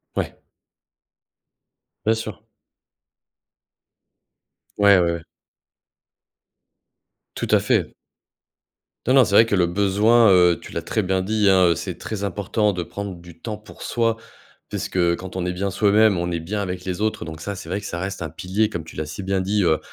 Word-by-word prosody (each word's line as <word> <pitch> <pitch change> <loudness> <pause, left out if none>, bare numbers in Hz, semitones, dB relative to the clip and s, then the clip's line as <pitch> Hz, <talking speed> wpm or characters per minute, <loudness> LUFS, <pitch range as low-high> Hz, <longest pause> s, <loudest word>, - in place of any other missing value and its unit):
Ouais. - - -2 1.7
Bien 110 - +4
sûr. 110 - -6 2.4
Ouais, 100 -2 +6
ouais, 85 -1 +2
ouais. 85 - -4 2.1
Tout - - -3
à - - +6
fait. - - 0 1.1
Non, 130 - +4
non. 130 -3 +7
C'est 100 - -4
vrai 110 +3 +7
que 105 - +1
le 90 -2 +3
besoin, 100 +5 +4
heu, 90 -2 +5
tu - - -11
l'as 85 - -3
très 110 +6 -1
bien 95 -1 0
dit, 105 0 +2
hein, 95 -1 +5
heu, 85 - +2
c'est - - -5
très 100 -2 -5
important 105 +2 0
de 90 -2 -3
prendre 100 +2 -6
du 85 -1 -14
temps 110 +1 -5
pour 105 - -15
soi. 115 -1 0 0.5
Puisque 85 -2 0
quand 95 0 -9
on 90 - -2
est - - 0
bien 100 +2 -2
soi-même, 105 0 +4
on 85 0 -2
est 85 - -1
bien 100 +6 -3
avec 90 -1 -4
les 90 +1 -3
autres. 110 0 -1
Donc 80 -1 -8
ça, 100 +3 -4
c'est 90 - -9
vrai 95 +4 -2
que 100 - -10
ça 85 - -4
reste 95 +1 -4
un 80 - -3
pilier, 100 +6 -1
comme 85 - -5
tu 80 - -13
l'as 75 0 -4
si 80 +6 -6
bien 95 0 0
dit, 100 +2 +1
heu, 80 -2 +3
95 Hz, 185 wpm, -22 LUFS, 85-105 Hz, 2.4 s, non